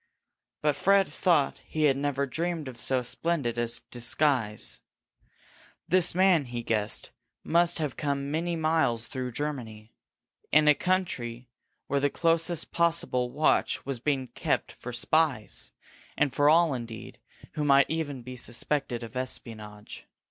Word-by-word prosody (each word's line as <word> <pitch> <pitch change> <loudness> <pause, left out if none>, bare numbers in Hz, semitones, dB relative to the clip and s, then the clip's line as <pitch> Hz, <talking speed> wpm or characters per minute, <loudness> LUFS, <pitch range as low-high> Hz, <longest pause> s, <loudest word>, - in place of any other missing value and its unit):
But 150 -1 +2
Fred 195 +5 +4
thought 165 -7 +1
he 155 - -3
had 140 -3 +4
never 140 0 -1
dreamed 165 +2 -3
of 125 -2 -9
so 130 -1 0
splendid 125 -3 -1
a 120 - 0 0.2
disguise. 120 -3 +1 1.1
This 180 -2 +5
man, 185 -5 +4
he 120 -1 -5
guessed, 105 -2 -2 0.3
must 170 +1 +2
have 150 -5 -3
come 140 -1 -2
many 170 +2 -1
miles 155 -8 +1
through 125 -1 -5
Germany, 115 -7 -5 0.6
in 150 +1 +5
a 150 - +8
country 125 -10 -2 0.4
where 140 - 0
the 145 +1 +2
closest 165 +1 0
possible 165 -7 +1
watch 150 +5 +1
was 135 -3 -3
being 135 -1 -1
kept - - -1
for 125 - -8
spies, 135 -1 0 0.5
and 140 - +1
for 145 0 +4
all, 165 -1 +4
indeed, 115 -3 -7 0.3
who 150 - -2
might 140 -1 +5
even 145 -6 -3
be 130 +1 -8
suspected 125 0 -2
of 115 0 -9
espionage. 110 -5 -6
140 Hz, 140 wpm, -28 LUFS, 120-160 Hz, 1.1 s, a